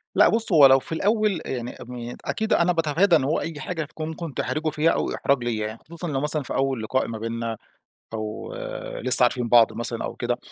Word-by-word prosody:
لأ، - - +6
بُص 225 -2 +5
هو 150 -5 +7
لو 135 0 +7
في - - -13
الأول 205 +1 0
يعني 125 -2 -4
ام 120 0 -7
أكيد 220 0 -1
أنا 175 +1 +3
باتفادى 165 +3 +2
إن 145 - +2
هو 145 +4 0
أي 160 -3 -6
حاجة 165 -2 -4
تكون 155 +2 -7
ممكن 160 -2 -6
تحرجه 155 +1 -2
فيها، 155 +2 +1
أو - - -2
إحراج 135 -3 0
ليّا 110 -3 -2
يعني، 110 +1 -9
خصوصًا 170 +2 -7
لو 140 -4 -2
مثلًا 150 -1 +1
في - - -6
أول 135 -4 -1
لقاء 130 +4 -1
ما 115 - -5
بيننا 115 0 -4 0.6
أو 110 0 -6 0.5
لسه 130 0 +6
عارفين 120 -1 +1
بعض 115 -1 +5
مثلًا 115 0 -3
أو - - -5
كده. 120 0 -2
135 Hz, 215 wpm, -24 LUFS, 120-160 Hz, 0.6 s, هو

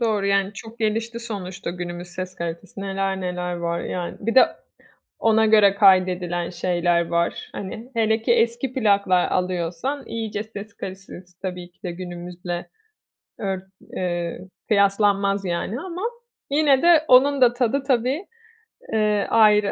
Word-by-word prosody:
Doğru, 215 -4 +1
yani 195 0 +2
çok 225 +3 -11
gelişti 225 +2 -1
sonuçta 190 -6 -5
günümüz 175 0 -6
ses 185 +1 -6
kalitesi, 170 +3 -6
neler 195 -1 -2
neler 180 -1 -3
var, 170 0 -2
yani. 175 -1 -4
Bir 230 +4 -2
de 260 - +8 0.7
ona 220 0 +3
göre 210 -2 +6
kaydedilen 185 -3 +3
şeyler 175 -1 +1
var, 170 0 -1
hani, 220 +6 -7
hele 220 -1 +1
ki 235 - +3
eski 235 +2 +1
plaklar 200 -7 +2
alıyorsan 180 - -2
iyice 220 -2 -3
ses 215 -1 -10
kalitesi 185 -2 -9
tabii 180 -2 -5
ki - - -41
de 180 - -3
günümüzle 175 0 -6 0.7
ört 190 -3 -3 0.3
eee, 175 -2 -2 0.3
kıyaslanmaz 200 -1 +2
yani 180 +7 -2
ama 360 +1 -6 0.5
yine 285 -2 +4
de 335 -3 +5
onun 275 +2 +5
da 240 -1 +6
tadı 250 +2 0
tabii, 270 - 0 0.7
eee, 210 -2 +2
ayrı. 210 -2 +5
200 Hz, 135 wpm, -23 LUFS, 180-225 Hz, 0.7 s, de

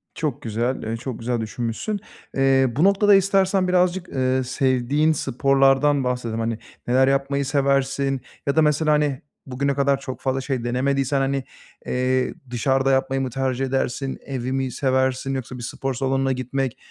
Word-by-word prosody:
Çok 150 -6 -3
güzel. 120 +3 -2
Eee, 115 +1 -3
çok 125 0 -6
güzel 120 0 -1
düşünmüşsün. 115 - -3 0.4
Eee, 135 0 +4
bu 150 - +2
noktada 200 +1 +5
istersen 195 -1 +3
birazcık, 180 0 +1
eee, 130 0 0
sevdiğin 130 +3 +1
sporlardan 135 0 +2
bahsedelim. 125 -3 -2
Hani, 115 0 -1 0.3
neler 130 +2 +4
yapmayı 140 +1 +1
seversin 135 -1 +1 0.3
ya 140 - +1
da 160 - +5
mesela, 155 0 +2
hani, 150 -3 +1 0.2
bugüne 140 +2 -1
kadar 140 0 +2
çok 130 -1 -7
fazla 135 0 -1
şey 130 -2 -3
denemediysen, 135 +3 0
hani, 135 0 0 0.4
eee, 130 0 0 0.2
dışarıda 135 +3 +1
yapmayı 135 0 +1
mı 130 - -2
tercih 130 +1 -1
edersin, 135 0 -2
evi 130 -2 -4
mi 135 -1 -1
seversin 130 +1 0
yoksa 125 -1 -5
bir 120 - -8
spor 135 +2 -3
salonuna 135 +1 0
gitmek, 130 0 -2
135 Hz, 155 wpm, -23 LUFS, 130-140 Hz, 0.4 s, noktada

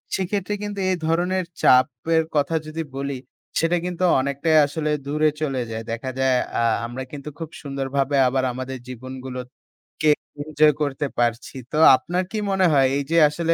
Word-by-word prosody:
সেক্ষেত্রে 195 +1 -2
কিন্তু 205 -1 -4
এ - - +2
ধরনের 180 +3 +1 0.2
চাপের 130 +6 +3
কথা 145 +3 +1
যদি 160 +1 -4
বলি, 140 -1 -3 0.4
সেটা 165 +2 +2
কিন্তু 180 0 -3 0.2
অনেকটাই 140 +4 0
আসলে 150 +1 -3 0.2
দূরে 150 +2 +2
চলে 135 -4 -1
যায়। 110 0 -5
দেখা 120 +3 -4
আ - - -12
যায় 130 -1 +3 0.5
আমরা 125 +2 -5
কিন্তু 145 0 -7
খুব 160 -2 -5
সুন্দরভাবে 140 0 -2 0.4
আমাদের 130 +1 -5
জীবনগুলোকে 130 +4 -5 0.3
এনজয় 155 0 +3
করতে 145 0 -1
পারছি। 120 +2 -1 0.2
তো 150 - -2 0.2
আপনার 175 +8 -2
কি 220 - -3
মনে 190 -1 +3
হয় 135 -2 +5
এই 140 - -1
যে 165 - +3
আসলে 165 +2 0
145 Hz, 155 wpm, -23 LUFS, 130-165 Hz, 0.5 s, হয়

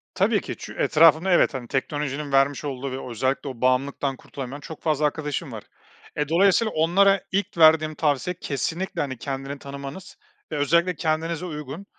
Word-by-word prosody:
Tabii - - +2
ki - - -6
çü - - -9
etrafında, 165 +4 +4
evet, 175 - +4
hani, 125 -3 -5
teknolojinin 145 +1 -3
vermiş 135 +1 +2
olduğu 135 -1 -4
ve 130 -1 -6
özellikle 130 +4 -1
o 125 -2 -9
bağımlılıktan 135 +2 +1
kurtulamayan 135 +1 -8
çok 160 +2 -10
fazla 155 -2 +1
arkadaşım 150 -1 -2
var. - - -7 0.5
Eee, 150 0 -1
dolayısıyla 195 +6 +3
onlara 195 +5 +4
ilk 195 -2 -2
verdiğim 155 -1 +5
tavsiye 150 +3 0
kesinlikle, 170 +6 -3
hani, 130 -3 -3
kendini 135 +1 -5
tanımanız 140 - -9 0.3
ve - - -2
özellikle 170 +5 +2
kendinize 160 +2 -1
uygun 150 +3 -7
150 Hz, 160 wpm, -24 LUFS, 135-165 Hz, 0.5 s, verdiğim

